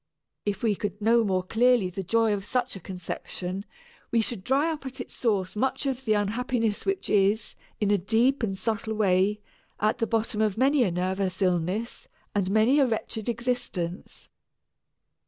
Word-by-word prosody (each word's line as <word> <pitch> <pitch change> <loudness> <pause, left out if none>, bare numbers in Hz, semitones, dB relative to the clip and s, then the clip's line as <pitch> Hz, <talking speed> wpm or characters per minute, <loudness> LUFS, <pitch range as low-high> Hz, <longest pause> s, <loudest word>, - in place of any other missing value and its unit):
If 205 +1 -2
we 220 -3 +3
could 205 0 -4
know 230 +2 +4
more 185 -3 0
clearly 225 -1 +3
the 195 +2 -4
joy 225 +3 +2
of 200 -1 -2
such 250 +3 -1
a - - -7
conception, 185 +1 -5 0.4
we 235 - +2
should 220 -3 -2
dry 280 +7 +2
up 305 -3 -5
at 265 +1 -8
its 245 - -6
source 195 -6 0
much 265 +6 0
of 265 -1 -2
the 215 - +3
unhappiness 225 - 0
which 390 -1 -1
is, 205 +2 +2 0.3
in 205 -1 +1
a 205 - +3
deep 235 +9 +2
and 195 -4 -1
subtle 220 +1 -2
way, 200 0 +2 0.4
at 215 +1 +1
the 230 - +1
bottom 225 -1 0
of 215 -2 +1
many 275 +3 +4
a 205 - +2
nervous 185 +1 -1
illness 185 +4 -1 0.3
and 195 -3 0
many 220 +8 +4
a 275 - +4
wretched 220 -1 -3
existence. 235 -8 -3
215 Hz, 175 wpm, -27 LUFS, 195-240 Hz, 0.4 s, know